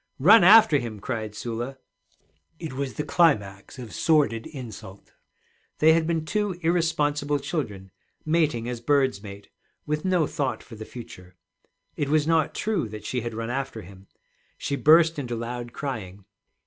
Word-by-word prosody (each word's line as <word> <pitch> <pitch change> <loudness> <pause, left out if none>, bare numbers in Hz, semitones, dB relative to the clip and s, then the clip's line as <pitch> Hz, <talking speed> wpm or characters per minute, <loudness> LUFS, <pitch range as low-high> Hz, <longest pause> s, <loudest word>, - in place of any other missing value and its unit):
'Run 200 +9 +7
after 205 -5 +7
him!' 115 -4 -6
cried 110 -1 -4
Sula. 120 +4 -5 0.8
It 160 -4 -7
was 135 -1 -4
the 150 - -2
climax 125 - +1
of 120 -4 -9
sordid 145 -8 +1
insult. 110 -8 -10 0.6
They 160 +1 +5
had 160 -1 +1
been 165 -2 -1
two 205 0 -1
irresponsible 150 -4 +1
children 125 - -5 0.3
mating 155 -8 +1
as 120 -1 -5
birds 135 -5 +1
mate, 100 -1 -11 0.4
with 150 0 -2
no 180 -4 +2
thought 140 -2 -3
for - - -14
the 110 0 -8
future. 90 -8 -11 0.6
It 145 - -1
was 155 0 +2
not 160 -1 +1
true 195 - -1
that 105 0 -9
she 125 - -2
had 115 -1 -5
run 115 +1 -4
after 135 -4 -4
him. 95 +2 -15 0.5
She 140 - -2
burst 160 +2 +5
into 120 -4 -4
loud 120 +1 -5
crying. 105 -9 -6
135 Hz, 155 wpm, -25 LUFS, 115-155 Hz, 0.8 s, Run